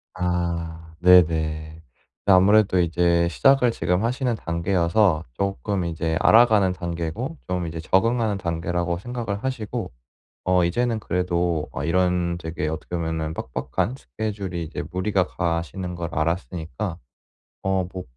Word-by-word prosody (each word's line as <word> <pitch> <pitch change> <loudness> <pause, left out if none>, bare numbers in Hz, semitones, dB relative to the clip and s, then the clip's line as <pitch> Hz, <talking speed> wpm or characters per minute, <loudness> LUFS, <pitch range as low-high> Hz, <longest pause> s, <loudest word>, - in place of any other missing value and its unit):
아 85 -2 -3
네네. 90 0 +8 1.0
네 100 - +6
아무래도 95 0 +5
이제 85 0 +2
시작을 135 - +4
지금 90 0 0
하시는 125 +1 0
단계여서 85 -1 +1
쪼끔 100 - -2
이제 80 -1 -1
알아가는 110 -5 +5
단계고 85 - -4
좀 90 -1 -1
이제 80 0 -5
적응하는 110 +5 +1
단계라고 85 0 -2
생각을 115 -2 -4
하시고 120 -5 -3 0.5
어 90 -1 +3
이제는 115 +6 0
그래도 90 -5 -1
어 - - -4
이런 90 0 +1
되게 80 -2 -3
어떻게 80 +3 -4
보면은 80 -1 -2
빡빡한 65 -1 -2
스케줄이 90 - -4
이제 80 - -5
무리가 95 0 +1
가시는 85 +2 -3
걸 85 -1 -4
알았으니까 85 - -2 0.7
어 95 -2 0
뭐 95 -1 -5
90 Hz, 300 characters per minute, -24 LUFS, 85-100 Hz, 1.0 s, 네네